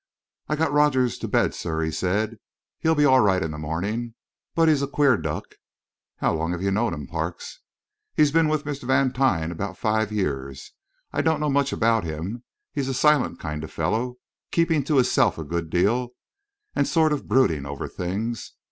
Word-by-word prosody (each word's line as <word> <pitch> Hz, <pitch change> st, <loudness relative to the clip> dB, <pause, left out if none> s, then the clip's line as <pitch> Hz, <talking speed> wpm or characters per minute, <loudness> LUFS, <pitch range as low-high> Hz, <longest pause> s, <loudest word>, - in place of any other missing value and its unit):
"I 150 Hz, -, +1 dB
got 160 Hz, 0 st, 0 dB
Rogers 140 Hz, -4 st, +3 dB
to -, -, -4 dB
bed, -, -, +2 dB
sir," 80 Hz, -1 st, -3 dB
he 80 Hz, -, -1 dB
said. 105 Hz, +7 st, -1 dB, 0.4 s
"He'll 160 Hz, 0 st, +2 dB
be 150 Hz, -1 st, +4 dB
all 130 Hz, -2 st, +6 dB
right 95 Hz, -4 st, +3 dB
in 80 Hz, -, -3 dB
the 75 Hz, -, -6 dB
morning. 100 Hz, +10 st, -3 dB, 0.4 s
But 165 Hz, -1 st, +4 dB
he's 150 Hz, -3 st, +4 dB
a 140 Hz, -, 0 dB
queer 140 Hz, -1 st, +3 dB
duck." -, -, -5 dB, 0.6 s
"How -, -, +1 dB
long 80 Hz, +2 st, -1 dB
have 90 Hz, +1 st, -4 dB
you 100 Hz, -, +1 dB
known 110 Hz, -1 st, +1 dB
him, 75 Hz, -1 st, -7 dB
Parks?" -, -, -5 dB, 0.6 s
"He's 150 Hz, -2 st, +4 dB
been 165 Hz, +1 st, +4 dB
with 155 Hz, -1 st, 0 dB
Mr. 145 Hz, -3 st, -5 dB
Vantine 130 Hz, -10 st, +2 dB
about 95 Hz, +3 st, -5 dB
five 110 Hz, -1 st, 0 dB
years. 70 Hz, -10 st, -3 dB, 0.4 s
I -, -, +1 dB
don't 160 Hz, -1 st, +1 dB
know 150 Hz, -1 st, 0 dB
much 140 Hz, 0 st, +2 dB
about 115 Hz, -1 st, +2 dB
him; 85 Hz, +9 st, -5 dB, 0.3 s
he's 140 Hz, -2 st, -2 dB
a 135 Hz, -, -1 dB
silent 150 Hz, +1 st, +3 dB
kind 75 Hz, 0 st, -4 dB
of 80 Hz, -, -8 dB
fellow, 125 Hz, +3 st, -1 dB, 0.3 s
keeping 165 Hz, -3 st, +2 dB
to 150 Hz, -1 st, +2 dB
hisself 125 Hz, -4 st, +3 dB
a 80 Hz, -, -4 dB
good 85 Hz, +1 st, -3 dB
deal 120 Hz, +9 st, +1 dB, 0.6 s
and -, -, +2 dB
sort 160 Hz, -3 st, +3 dB
of 145 Hz, -, -4 dB
brooding 85 Hz, -, +2 dB
over 70 Hz, 0 st, -5 dB
things. 105 Hz, +6 st, -4 dB
115 Hz, 190 wpm, -24 LUFS, 85-140 Hz, 0.6 s, all